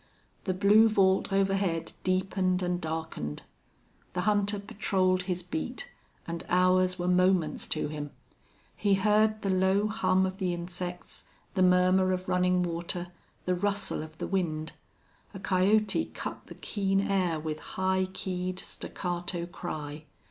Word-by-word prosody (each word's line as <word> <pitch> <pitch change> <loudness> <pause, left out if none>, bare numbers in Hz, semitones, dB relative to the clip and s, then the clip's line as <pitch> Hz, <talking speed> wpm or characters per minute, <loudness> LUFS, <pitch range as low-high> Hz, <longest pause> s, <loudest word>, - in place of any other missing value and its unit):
The 185 - 0
blue 210 +4 +6
vault 195 -2 +3
overhead 195 -3 +1
deepened 185 0 +1
and 180 0 -1
darkened. 160 - -4 0.7
The 180 - -1
hunter 205 +1 +2
patrolled 190 -2 0
his 180 0 -1
beat, 245 - -5 0.3
and 170 0 -5
hours 185 0 +3
were 175 0 -2
moments 180 -2 +2
to 155 - +1
him. 150 -1 -5 0.7
He 200 -1 +2
heard 215 +2 +2
the 195 - +1
low 190 +2 +3
hum 200 -4 +2
of 190 +1 -4
the 180 -3 0
insects, 175 +1 -6 0.3
the 190 - 0
murmur 185 +1 +4
of 185 0 -3
running 180 0 +2
water, 175 +1 -3 0.4
the 180 - +2
rustle 200 +1 -1
of 155 0 -10
the - - -3
wind. 160 -5 -1 0.6
A - - -6
coyote 195 - +2
cut - - -7
the - - -10
keen 195 -2 0
air 185 -5 +1
with 155 0 -4
high 190 0 0
keyed, 185 -1 -3
staccato 175 -2 -4
cry. 155 -4 -6
185 Hz, 140 wpm, -29 LUFS, 175-195 Hz, 0.7 s, blue